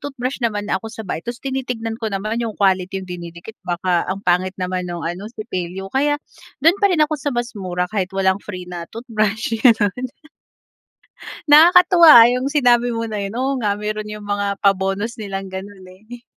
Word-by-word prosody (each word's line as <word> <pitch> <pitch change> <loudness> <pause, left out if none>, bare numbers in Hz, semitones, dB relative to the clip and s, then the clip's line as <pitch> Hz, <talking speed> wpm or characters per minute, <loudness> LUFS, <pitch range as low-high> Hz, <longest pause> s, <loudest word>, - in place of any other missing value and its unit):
toothbrush 270 -2 -5
naman 210 -4 -1
na 190 - 0
ako - - -9
sa 220 0 -9
bahay 175 -4 -4
ta's 240 +6 -7
tinitignan 250 -4 -3
ko 220 - -2
naman 215 +3 -3
yung 225 -3 -4
quality 190 -1 0
yung - - -16
dinidikit 170 +3 -8
baka 175 0 -1
ang 195 +1 -4
pangit 185 +1 +1
naman 180 0 -3
nung 175 -1 -5
ano 180 +5 -5
sipilyo 190 -4 -6
kaya, 290 +2 +2 0.5
dun 340 +5 +5
pa 400 - +4
rin 345 -5 +2
ako 300 -1 -4
sa 290 - -2
mas 240 -2 -2
mura 180 -4 -3
kahit 185 0 -2
walang 190 0 +1
free 185 -4 -8
na 175 -1 -8
toothbrush 220 -2 -2
ganun. 225 -1 +3 1.4
Nakakatuwa 335 -4 +8
yung 260 +3 -2
sinabi 245 -4 +3
mo 230 0 -3
na 210 -2 -4
yun, 195 - -4
oo 270 +1 0
nga 205 -1 0
meron 210 0 -4
yung 210 -1 -8
mga 200 -1 -2
pa-bonus 195 +3 0
nilang 195 -3 -5
ganun 190 0 -9
eh. 220 +6 -13
210 Hz, 185 wpm, -20 LUFS, 190-240 Hz, 1.4 s, Nakakatuwa